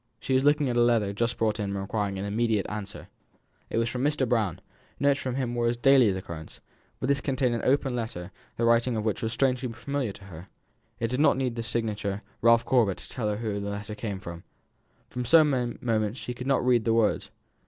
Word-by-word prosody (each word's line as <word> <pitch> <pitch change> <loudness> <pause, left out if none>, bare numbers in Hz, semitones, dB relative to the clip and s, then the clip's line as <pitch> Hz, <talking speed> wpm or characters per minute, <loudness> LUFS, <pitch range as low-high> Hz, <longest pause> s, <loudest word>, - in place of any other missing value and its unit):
She 130 - -2
was 130 +1 +3
looking 145 0 +3
at 120 - -1
a 120 - +4
letter 115 -4 +2
just 115 +3 -1
brought 110 -1 0
in 105 - -1
and 100 - -3
requiring 100 0 -2
an 95 - -3
immediate 110 0 0
answer. 105 -1 -6 0.6
It - - -2
was 115 0 +2
from 125 +2 -3
Mr. 145 -3 +1
Brown. 110 -8 0 0.4
Notes 140 0 +3
from 130 -2 -3
him 130 -3 -2
were 120 -1 +1
of 120 0 -1
daily 135 -4 +6
occurrence, 85 -4 -6 0.4
but 130 - -2
this 140 0 +2
contained 130 -3 0
an 115 - -1
open 135 -1 +2
letter 100 -6 -5 0.3
the 115 - +1
writing 115 0 +3
of 110 - -2
which 110 - -1
was 110 - -1
strangely 125 -1 0
familiar 125 -1 -3
to 100 - -14
her 90 -1 -11 0.5
it 115 - -1
did 125 +2 -2
not 150 - +4
need 130 -3 -1
the 115 - -3
signature 110 -3 -3 0.2
"Ralph 115 0 +5
Corbet," 115 -7 +2
to - - -10
tell 115 -5 -3
her 105 - -1
whom 105 -3 -3
the 100 - -3
letter 105 +1 -5
came 105 -3 -4
from. 85 -2 -8 0.6
For 125 - -4
some 130 -4 +3
moments 110 -1 0
she 125 - -5
could 125 +2 -7
not 135 -2 +2
read 120 -3 +4
the 115 0 +2
words. 115 -2 +1
115 Hz, 225 wpm, -27 LUFS, 105-125 Hz, 0.6 s, daily